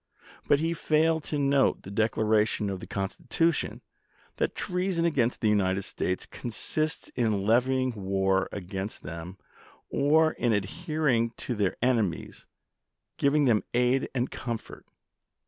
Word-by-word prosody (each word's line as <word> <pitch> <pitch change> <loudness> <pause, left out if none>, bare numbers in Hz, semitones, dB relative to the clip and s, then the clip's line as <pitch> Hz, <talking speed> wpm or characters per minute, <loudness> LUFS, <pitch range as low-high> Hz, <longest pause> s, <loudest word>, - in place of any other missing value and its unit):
But 140 - +4
he 165 +2 0
failed 160 0 +2
to 150 - -2
note 140 -1 +2
the 95 - -9
declaration 110 -1 +1
of 95 - -4
the - - -9
Constitution 125 +11 -1 0.6
that - - -1
treason 180 -1 -1
against 130 -8 +1
the 110 - +2
United 100 -2 +2
States 90 -1 -2
consists 155 +6 -3
in 110 -5 0
levying 130 +3 +2
war 95 -2 0
against 95 +1 -5
them, 85 +3 -7 0.5
or 155 +3 +4
in 120 -6 0
adhering 125 - 0
to 125 - -1
their 105 -4 0
enemies, 115 -9 0 0.7
giving 145 +1 +3
them 115 -5 +3
aid 125 +2 +2
and 125 0 0
comfort. 115 -2 -6
120 Hz, 130 wpm, -28 LUFS, 100-145 Hz, 0.7 s, But